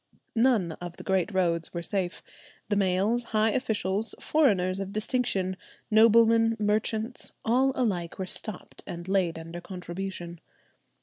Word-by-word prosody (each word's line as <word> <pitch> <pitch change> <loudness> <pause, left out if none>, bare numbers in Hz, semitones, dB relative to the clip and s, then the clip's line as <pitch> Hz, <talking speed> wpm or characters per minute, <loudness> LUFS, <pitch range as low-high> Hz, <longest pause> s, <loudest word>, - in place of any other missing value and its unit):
None 225 -7 +3
of 175 -1 -7
the - - -9
great 190 +1 +1
roads 170 -3 0
were 170 - -3
safe: 185 -1 -2 0.5
the 205 - +2
mails, 200 +5 +1
high 215 +1 +4
officials, 215 -3 0
foreigners 195 -11 +2
of 195 0 -4
distinction, 215 -4 0 0.4
noblemen, 225 +1 +5
merchants, 220 +2 -1
all 255 +4 +3
alike 185 -9 -1
were 190 - -3
stopped 200 +1 -5
and 170 +1 -6
laid 185 -4 +1
under 165 +1 -7
contribution. 175 -1 -6
195 Hz, 130 wpm, -27 LUFS, 180-225 Hz, 0.5 s, noblemen